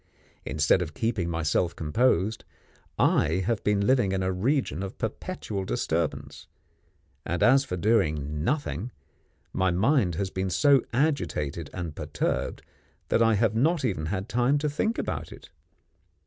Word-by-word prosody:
Instead 75 +4 +2
of 80 -3 -5
keeping 110 -7 -1
myself 80 +1 0
composed, 105 +4 +1 0.5
I 80 +5 +2
have 115 -1 -1
been 100 -1 +1
living 120 -7 +3
in 95 -1 0
a 95 - 0
region 115 - 0
of 95 0 -6
perpetual 110 - -4
disturbance; - - -2 0.8
and, 85 +1 -1
as 135 +3 +5
for 90 - -4
doing 75 -8 +1
nothing, 125 - -1 0.6
my 95 0 +2
mind 100 - +2
has 95 +2 -2
been 95 0 -2
so 140 +7 +4
agitated 85 - -1
and 85 -4 -5
perturbed - - -2 0.5
that - - +2
I 115 -1 +4
have 110 0 +2
not 145 +6 +2
even 85 -9 -1
had 95 +3 -3
time 125 +3 +2
to 150 +1 -1
think 220 +10 -1
about - - -3
it. - - -13
100 Hz, 145 wpm, -27 LUFS, 85-125 Hz, 0.8 s, as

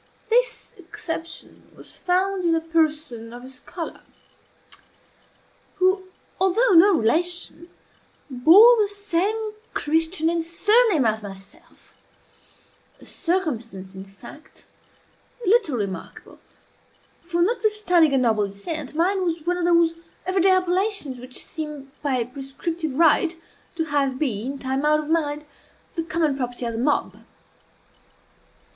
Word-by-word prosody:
This - - +1
exception 330 0 -8
was - - -11
found 370 +1 0
in 335 -1 +2
the 325 - +2
person 310 -8 -1
of 245 +1 -10
a - - -9
scholar 320 +6 -7 1.7
who, 375 0 +2 0.3
although 385 +6 +3
no 375 +2 +7
relation, 340 +6 -1 0.6
bore 345 - +7
the 415 - +2
same 410 +2 -2 0.2
Christian 320 +2 0
and 335 0 0
surname 410 - +3
as 220 0 +1
myself, 195 -1 -13 1.1
a - - -16
circumstance, 230 - -3
in 190 0 -8
fact, 220 +10 -14 0.8
little 395 - +3
remarkable; 200 -3 -6 0.8
for, 345 0 0
notwithstanding 410 - +2
a - - +4
noble 220 -5 +2
descent, 265 +10 -6
mine 375 +4 +1
was 330 -3 -2
one 355 +1 0
of 350 - -1
those 340 -1 +4 0.3
every 370 +1 +1
day 385 - +5
appellations 370 - 0
which 250 +1 -6
seem 300 -4 -7
by 260 -5 0
prescriptive 275 +4 -5
right 330 +2 +3 0.4
to 325 - 0
have 285 -4 0
been, 260 -1 -2
time 265 +1 -2
out 305 0 +3
of 305 0 -6
mind, 300 -2 0 0.5
the 335 - -2
common 320 -3 0
property 245 -2 -4
of 230 - -3
the 225 - -4
mob. 285 +4 0
325 Hz, 125 wpm, -23 LUFS, 265-360 Hz, 1.7 s, no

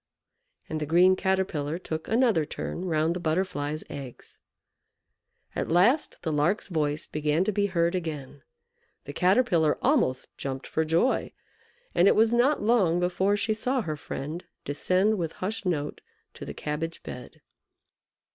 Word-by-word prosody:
And 155 - -3
the 150 - -3
green 180 +4 +5
Caterpillar 185 -6 -1
took 160 -3 -5
another 225 -8 +3
turn 175 +4 -5
round 160 -1 +1
the - - -3
Butterfly's 155 -3 -1
eggs. 135 -4 -9 1.2
At - - -2
last 200 - +3
the 160 - -1
Lark's 160 +8 +1
voice 150 -3 -1
began 150 +3 0
to 215 - 0
be 205 0 +1
heard 170 -2 +1
again. 155 -7 -5 0.6
The - - -7
Caterpillar 180 -5 +3
almost 240 - +1
jumped 135 -1 -4
for 160 - 0
joy, 165 +11 +1 0.6
and 180 - +5
it - - +5
was 225 +1 +4
not 245 +2 +3
long 200 -7 +3
before 185 +3 +1
she 220 +1 0
saw 250 +4 0
her 155 -4 -3
friend 150 +3 -6 0.2
descend 185 +8 +1
with 165 -2 -2
hushed 205 +1 -4
note 150 -4 -2 0.3
to - - -9
the - - -6
cabbage 160 +2 -4
bed. - - -9
175 Hz, 145 wpm, -27 LUFS, 155-200 Hz, 1.2 s, green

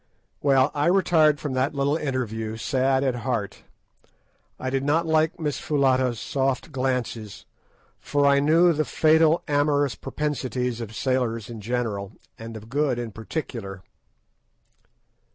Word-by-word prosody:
Well, 135 0 +3
I 145 +2 +1
retired 165 -5 +4
from 145 -4 -4
that 130 +3 0
little 140 +1 +1
interview 110 -7 -3
sad 130 +2 +1
at 130 -3 0
heart. 115 -4 -3 1.0
I 130 - -3
did 135 0 0
not 155 +4 +2
like 160 +2 +1
Miss 150 -3 -2
Foulata's 130 -5 +1
soft 135 -1 -1
glances, 125 -5 -3 0.5
for 145 0 0
I 140 0 +5
knew 165 +4 +4
the 155 0 0
fatal 160 +2 +3
amorous 145 -2 +2
propensities 125 -3 -3
of 110 -1 -7
sailors 120 -4 -1
in 115 -2 -8
general, 110 -3 -3 0.3
and 115 0 -7
of 110 0 -12
Good 140 0 0
in 120 -2 -4
particular. 110 - -6
130 Hz, 135 wpm, -24 LUFS, 120-150 Hz, 1.0 s, I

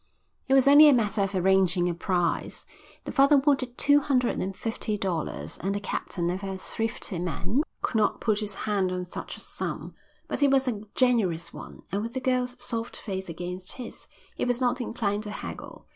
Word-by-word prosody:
It 265 - +4
was 270 0 +5
only 295 +2 +9
a 280 - +6
matter 215 -3 +1
of 195 0 -1
arranging 185 -1 +3
a 175 - 0
price. 175 0 -1 0.4
The - - -5
father 280 +1 +5
wanted 270 -3 +1
two 285 0 +5
hundred 265 -4 +1
and 190 0 -3
fifty 225 -1 -2
dollars, 160 - -3
and 195 +3 -1
the - - -1
captain, 190 -3 -3
never 185 +3 -2
a - - -5
thrifty 220 -2 -4
man, 180 - -1 0.2
could 225 - 0
not 210 -1 +2
put 215 -2 +1
his 210 -2 -4
hand 195 -3 +1
on 180 0 -3
such 180 - -7
a - - -11
sum. - - -4 0.3
But - - -2
he 285 - +5
was 270 -1 +3
a 220 -5 -1
generous 215 -10 +2
one, - - -10
and 200 +2 0
with 230 +3 -5
the - - 0
girl's 250 -1 0
soft 235 -1 -4
face 190 -3 -5
against 180 +3 -5
his, 250 -3 -8 0.3
he - - -2
was 245 -1 +1
not 250 0 +1
inclined 210 -3 -1
to 210 - -6
haggle. 210 - -7
210 Hz, 200 wpm, -27 LUFS, 185-250 Hz, 0.4 s, only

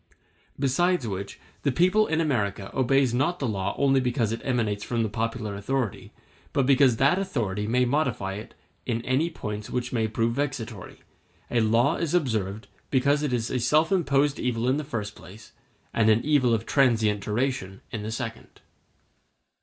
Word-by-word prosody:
Besides 140 +2 +1
which, 100 +1 -5 0.2
the 140 - +1
people 185 - +3
in 160 - 0
America 105 -10 -1
obeys 135 0 +2
the 120 - -1
law 145 +1 0 0.2
not - - -2
only 135 -1 +3
because 125 -3 0
it 115 - -3
emanates 110 -6 -1
from 115 -2 -1
the 110 - -1
popular 110 -1 -3
authority, 115 +1 -3 0.4
but 140 - +2
because 135 -2 +5
that 140 +9 +3
authority 105 - -2
may 125 +3 +2
modify 125 -8 0
it 105 +3 -9 0.3
in 115 -1 -2
any 135 +6 +1
points 105 -9 -6
which 125 0 -3
may 110 -2 +1
prove 115 +1 0
vexatory; 120 -7 -4 0.5
a 120 - +2
law 115 +4 +3
is 170 0 -1
observed 110 - -1 0.2
because 140 +2 +2
it 150 -3 -1
is 120 -1 -1
a 130 - 0
self 150 +7 +2
imposed 145 -6 +2
evil 120 -1 -1
in 130 +2 +2
the 150 - -2
first 110 -8 -4
place, 105 +3 -14 0.4
and 110 -1 +3
an 110 +2 +3
evil 145 -5 +3
of 115 -1 0
transient 110 -7 +2
duration 105 -3 -2
in 110 - -4
the 110 +1 -4
second. 115 0 -6
120 Hz, 170 wpm, -26 LUFS, 110-140 Hz, 0.5 s, because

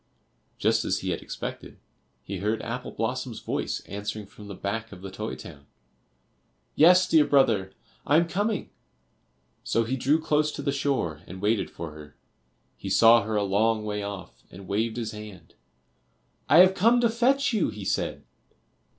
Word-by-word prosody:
Just - - +2
as - - -1
he - - -2
had - - -3
expected, - - -7 0.5
he 100 - -5
heard 105 +3 -1
Apple - - -5
blossom's - - -3
voice - - -3
answering 105 +1 -6
from 105 +1 -13
the 100 - -7
back 115 +4 -4
of 95 -2 -11
the 95 - -7
toy 105 +3 -5
town 70 -3 -12 1.1
"Yes, 180 +4 +6
dear 160 -2 +5
brother, 115 -10 +2 0.3
I 145 - +3
am 170 +1 +3
coming." 205 +4 -2 0.9
So 115 - +1
he 120 +4 -2
drew 140 +5 +2
close 150 -1 +1
to 145 - -6
the 140 - 0
shore, 135 - -1
and 95 +2 -9
waited 105 +2 0
for 85 -2 -7
her. 75 -1 -13 0.6
He - - -6
saw 115 +1 +6
her 110 0 -3
a 105 - +2
long 105 +2 +1
way 105 -1 -3
off, 100 -2 -8
and 95 +1 -12
waved 110 +4 -1
his 115 -2 -3
hand. 105 -6 -11 1.0
"I 160 +4 +8
have 185 +1 +6
come 230 +6 +4
to 235 - +4
fetch 250 +4 +2
you," 215 - +1
he 105 -2 -8
said. - - -2
110 Hz, 170 wpm, -26 LUFS, 100-150 Hz, 1.1 s, I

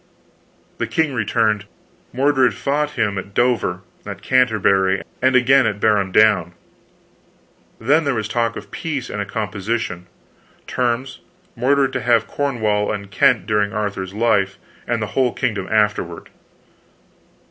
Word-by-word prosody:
The - - -1
king 160 -3 0
returned; 110 -2 0 0.5
Mordred 130 0 +2
fought 150 +1 -1
him 100 -3 0
at 100 +1 -10
Dover, 120 -7 +1 0.2
at 100 -3 -8
Canterbury, 100 -6 +2 0.2
and 130 0 +3
again 130 0 +5
at 105 -1 -2
Barham 105 -3 +2
Down. 95 -5 +3 1.3
Then 145 +8 +3
there 140 -3 0
was 110 -2 -2
talk 115 0 -1
of - - -9
peace 145 -6 -4
and 105 - -3
a 100 - -4
composition. 105 -3 -3 0.6
Terms, 125 +1 -2 0.4
Mordred 135 +1 +2
to 130 - -2
have 120 -2 +3
Cornwall 110 -7 -1
and 100 -2 -6
Kent 125 -4 +3
during 105 -1 0
Arthur's 100 -3 -3
life, 105 -4 +1 0.3
and 115 -2 -1
the 95 -4 -6
whole 125 0 +1
kingdom 100 -4 -2
afterward." 105 -6 0
110 Hz, 135 wpm, -20 LUFS, 100-130 Hz, 1.3 s, again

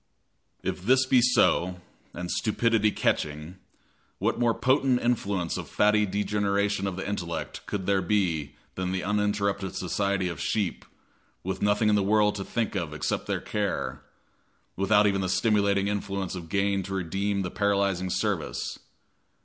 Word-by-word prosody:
If - - -3
this 130 +6 +4
be 130 -1 +4
so, 90 -7 +3 0.3
and 90 0 -5
stupidity 110 -1 +2
catching, 75 -2 -1 0.6
what - - 0
more 120 -2 +2
potent 130 -1 +2
influence 100 -8 -1
of - - -6
fatty 105 0 +3
degeneration 100 0 0
of 95 - -3
the 95 - -5
intellect 85 -4 -4
could 95 -3 -3
there 100 0 +2
be 85 -7 0 0.2
than 90 0 -2
the 95 - -2
uninterrupted 100 -1 0
society 100 +1 0
of 85 -3 -5
sheep, 105 -4 -1 0.6
with 95 +1 -3
nothing 105 +1 +2
in 105 - +4
the 105 - +3
world 105 +1 +3
to 100 - -3
think 115 +2 -2
of 85 -6 -3
except - - -2
their - - -1
care 95 -10 -2 0.7
without 105 +2 +4
even 100 -1 +2
the 95 - -1
stimulating 100 -1 +2
influence 100 -2 -2
of 85 -3 -7
gain 100 +1 +1
to 95 +1 -5
redeem 95 +3 -1
the 90 - -4
paralyzing 100 -2 +1
service. - - -2
100 Hz, 150 wpm, -27 LUFS, 95-105 Hz, 0.7 s, this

